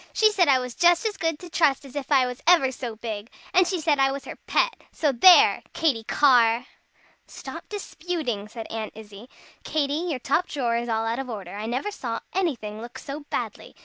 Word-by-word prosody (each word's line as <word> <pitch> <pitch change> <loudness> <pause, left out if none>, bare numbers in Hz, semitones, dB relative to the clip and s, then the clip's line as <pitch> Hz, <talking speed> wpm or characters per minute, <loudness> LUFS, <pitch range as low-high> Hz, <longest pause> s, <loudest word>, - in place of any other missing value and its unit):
"She 435 -1 +4
said 370 -5 +3
I 270 -2 +5
was 250 -1 -4
just 345 - +3
as 430 -2 -1
good 325 -2 -1
to 355 - -11
trust 300 -5 +1
as 270 - -13
if 285 0 -5
I 265 -3 +5
was 250 0 -6
ever 330 -7 +5
so 245 -3 -6
big. 220 -1 -6 0.2
And 365 -1 +5
she 360 -1 -1
said 300 -3 +1
I 270 0 +4
was 275 0 -6
her - - -7
pet. - - +1
So 300 -3 +1
there! 345 +9 +7
Katy 265 -9 0
Carr!" 245 -4 +4 0.6
"Stop - - -9
disputing," 320 - -4
said 225 +1 -8
Aunt 220 -1 -5
Izzie. 215 +2 -12 0.3
"Katy 285 -2 -1 0.2
your 295 - -1
top 280 +8 0
drawer 245 -5 -1
is 235 +1 -2
all 225 0 0
out 230 +3 -1
of 265 -1 -5
order. 200 -6 -7
I 210 +2 -5
never 255 - -2
saw 235 - -4
anything 235 - -2
look 240 +1 -9
so 285 +1 -7
badly. - - -5
265 Hz, 210 wpm, -25 LUFS, 230-325 Hz, 0.6 s, there